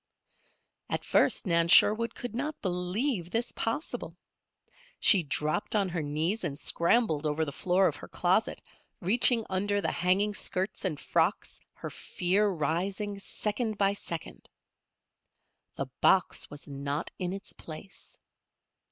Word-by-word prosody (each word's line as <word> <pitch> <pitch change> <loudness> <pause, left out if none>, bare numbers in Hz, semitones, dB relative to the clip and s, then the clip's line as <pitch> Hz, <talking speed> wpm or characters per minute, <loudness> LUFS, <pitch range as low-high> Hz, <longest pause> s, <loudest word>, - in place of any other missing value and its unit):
At - - -3
first - - +2
Nan 170 -2 +2
Sherwood 215 +6 +6
could 245 -3 -6
not 295 +6 -3
believe 180 - -1
this 230 +5 -1
possible. 230 +8 -4 0.8
She 195 - +6
dropped 150 +6 -1
on 200 -3 +1
her 170 -2 -2
knees 155 +9 -1
and 140 - -3
scrambled 170 -1 +1
over 155 +2 0
the 145 - -5
floor 185 +5 +2
of - - -2
her - - -10
closet, - - 0 0.4
reaching 230 +4 +5
under 205 +2 0
the 165 - -1
hanging 190 +4 +1
skirts 190 0 -1
and 155 -6 -1
frocks, - - -1
her - - -8
fear 190 +4 0
rising, 190 +5 -2
second 215 +2 -3
by 200 0 +2
second. 170 -5 -7 1.3
The - - -3 0.2
box - - +3
was 145 0 -9
not 140 +2 -4
in 180 -1 -2
its 195 +1 -7
place. 165 +5 -10
190 Hz, 135 wpm, -29 LUFS, 165-210 Hz, 1.3 s, Sherwood